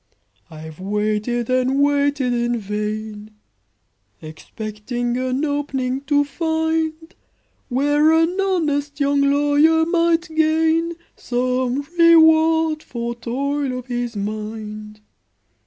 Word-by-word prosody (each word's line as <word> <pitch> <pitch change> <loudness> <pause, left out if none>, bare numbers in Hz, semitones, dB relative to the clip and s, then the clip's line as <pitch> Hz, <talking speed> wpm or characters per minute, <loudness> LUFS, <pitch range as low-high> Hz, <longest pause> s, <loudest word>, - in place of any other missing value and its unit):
"I've 160 0 -11
waited 210 +4 -1
and 255 +2 +1
waited 285 -2 +1
in 240 0 0
vain, 210 0 -5 0.8
Expecting 215 +9 -5
an 255 +3 -1
'opening' 275 -3 -2
to 290 0 +2
find, 320 +2 -2 0.6
Where 290 +4 +2
an 325 +2 +2
honest 295 -7 -1
young 280 0 +2
lawyer 290 +3 +3
might 335 0 +1
gain 320 +1 +2 0.2
Some 250 +2 -1 0.2
reward 320 -1 +5
for 235 -3 -5
toil 265 +3 -3
of 250 - -7
his 240 -2 -4
mind. 215 0 -6
275 Hz, 95 wpm, -20 LUFS, 235-315 Hz, 0.8 s, reward